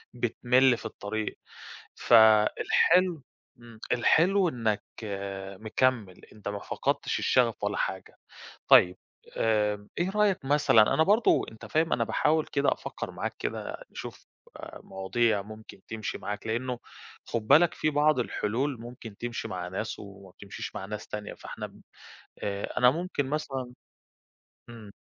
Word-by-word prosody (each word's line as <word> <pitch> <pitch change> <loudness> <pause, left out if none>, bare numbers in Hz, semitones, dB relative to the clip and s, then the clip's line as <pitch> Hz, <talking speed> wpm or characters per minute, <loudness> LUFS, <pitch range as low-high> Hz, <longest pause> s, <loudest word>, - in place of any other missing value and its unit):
بتمِل 125 +1 +3
في - - -12
الطريق، 110 +1 -4 0.6
فالحلو 120 +9 +4 0.4
إمم، 115 -2 -14
الحلو 180 +9 +4
إنك 110 -6 -1 0.8
مكمِّل، 110 -4 0
أنت 105 -1 -10
ما 100 0 -4
فقَدتش - - -2
الشغف - - +2
ولا - - -1
حاجة. - - -4 0.5
طيب 90 0 +7 0.4
آمم، 105 -2 0
إيه 175 +2 0
رأيك 205 -5 +1
مثلًا، 135 -6 +4
أنا 160 - +4
برضه 210 +7 +4
أنت 110 - -11
فاهم 160 +1 0
أنا 115 - +2
باحاول 155 +6 +1
كده 140 -1 +1
أفكّر - - -5
معاك - - -4
كده - - -4
نشوف - - -9 0.3
آآ - - -10
مواضيع 100 +2 0
ممكن 110 -1 -12
تمشِي 110 -1 -4
معاك 105 +1 -5
لإنه 120 +2 -2 0.5
خُد 115 -2 -3
بالك 160 +5 +6
في 155 - 0
بعض 150 0 +3
الحلول 125 +2 -1
ممكن 115 -3 -10
تمشِي 120 +1 -5
مع 90 -1 -5
ناس 110 +4 -4
وما 100 -1 -12
بتمشيش 100 +2 -8
مع 95 - -5
ناس 105 +2 -7
تانية، 105 0 -6
فاحنا - - -7
ب - - -18 0.6
آآ 100 0 -4
أنا 125 0 +6
ممكن 165 -2 -2
مثلًا 135 -4 -3 1.0
إمم. 110 -3 -11
115 Hz, 135 wpm, -28 LUFS, 105-145 Hz, 1.0 s, طيب